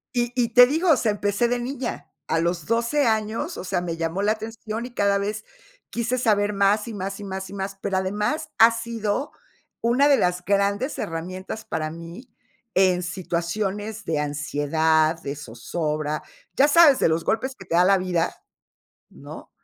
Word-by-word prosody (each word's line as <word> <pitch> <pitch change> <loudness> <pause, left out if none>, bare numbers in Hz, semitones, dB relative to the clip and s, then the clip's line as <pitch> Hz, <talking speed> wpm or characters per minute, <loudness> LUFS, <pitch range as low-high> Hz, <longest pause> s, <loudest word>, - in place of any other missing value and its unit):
y 240 -1 +1
y 240 -2 +1
te 245 +2 +8
digo, 320 +3 +3
sea, 230 -4 +1
empecé 205 +3 0
de 245 +1 0
niña, 255 +1 -5 0.2
a 160 - +1
los 170 -1 -1
12 235 +5 +1
años, 220 - -1
o - - -5
sea, 185 -1 -1
me 170 -2 -4
llamó 165 +3 -2
la 210 +1 +3
atención 225 +1 -6
y 250 - -10
cada 200 -3 +2
vez 210 +2 -3 0.5
quise 240 +2 -1
saber 210 -3 +2
más 200 +2 +2
y 230 - -6
más 195 0 -5
y - - -7
más 190 -1 -5
y - - -10
más, 195 0 -5
pero 195 -2 -1
además 205 +10 -1
ha 225 - +9
sido 230 +3 -3 0.5
una 245 +5 +3
de 280 -2 +5
las 180 0 0
grandes 200 +6 0
herramientas 185 +6 -5
para 155 -1 -3
mí, 170 +10 -10 0.5
en 185 -1 +4
situaciones 195 +4 -3
de 160 -2 -1
ansiedad, 155 +2 +1
de 140 +1 -4
zozobra, 150 +4 -3 0.3
ya 280 - +5
sabes, 300 -3 +6
de - - +4
los 160 +1 0
golpes 260 +4 -1
que 195 - -13
te 170 - -2
da 175 - +6
la 195 +1 +5
vida, 180 -2 -1 0.7
¿no? - - -11
200 Hz, 175 wpm, -24 LUFS, 175-230 Hz, 0.7 s, ha